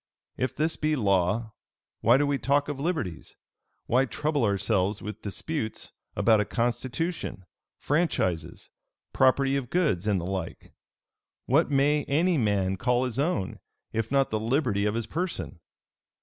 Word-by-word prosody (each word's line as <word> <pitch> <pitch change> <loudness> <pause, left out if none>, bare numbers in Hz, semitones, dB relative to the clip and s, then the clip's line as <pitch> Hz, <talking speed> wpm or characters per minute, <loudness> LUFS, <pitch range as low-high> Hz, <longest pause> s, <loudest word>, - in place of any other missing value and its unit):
If 130 - -2
this 160 +2 0
be 155 0 +1
law, 105 0 +1 0.5
why 120 +3 +5
do 145 - +2
we 140 -1 0
talk 140 +1 +2
of 145 -2 -4
liberties? 140 - -3 0.5
why 130 +3 +3
trouble 150 +1 -1
ourselves 100 -1 +1
with 105 - -7
disputes 110 +2 -4 0.2
about 110 +1 +4
a - - -1
constitution, 120 - -2 0.3
franchises, 95 - -1 0.4
property 135 +1 +3
of 135 -4 -2
goods, 145 - +1
and 100 -3 +2
the 85 - -5
like? 95 -2 -5 0.7
What 145 +6 +3
may 145 +1 +3
any 165 +3 +2
man 100 -4 +1
call 125 +3 +1
his 125 0 -3
own, 140 - -1 0.3
if 115 +1 -2
not 135 -1 +2
the 110 - 0
liberty 110 -3 +1
of 105 +1 0
his 115 -1 -1
person? 160 - -4
125 Hz, 145 wpm, -27 LUFS, 100-145 Hz, 0.7 s, why